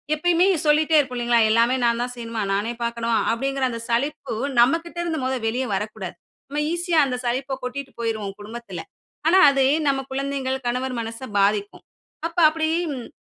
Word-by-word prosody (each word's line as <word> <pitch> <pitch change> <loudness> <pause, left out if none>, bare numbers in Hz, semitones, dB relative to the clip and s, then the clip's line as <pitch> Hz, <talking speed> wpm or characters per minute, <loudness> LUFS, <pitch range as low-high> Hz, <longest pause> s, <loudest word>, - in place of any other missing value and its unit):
எப்பயுமே 350 +3 +3 0.2
சொல்லிட்டே 310 +1 +3
இருப்போம் 260 -4 +1
இல்லிங்களா? 240 0 +3
"எல்லாமே 230 +3 +4
நான் 235 0 +2
தான் 245 +1 -2
செய்யணுமா? 230 -2 -4
நானே 210 +4 -1
பாக்கணுமா?" 235 0 -1 0.2
அப்டிங்கிற 270 +3 -1
அந்த 230 -1 -5
சலிப்பு 255 +5 -1 0.3
நம்மகிட்ட 330 +8 +2
இருந்து 325 -2 -2
மொத 260 +1 0
வெளிய 245 +4 0
வரக்கூடாது. 195 -2 -4 0.3
நம்ம 290 +2 -2
ஈஸியா 345 0 0
அந்த 255 -2 -2
சலிப்ப 265 +3 -1
கொட்டிட்டு 265 +2 -5
போயிருவோம் 215 -4 -3
குடும்பத்துல, 235 +3 -7 0.5
ஆனா 370 +3 +6
அது 275 -1 +2 0.2
நம்ம 275 -1 +2
குழந்தைங்கள், 270 -1 -2
கணவர் 250 +1 -1
மனச 230 0 -5 0.2
பாதிக்கும். 205 +1 +1 0.4
அப்ப 335 +1 -16
அப்படி 315 0 -1 0.2
ம் 250 -3 -7
250 Hz, 160 wpm, -23 LUFS, 230-280 Hz, 0.5 s, ஆனா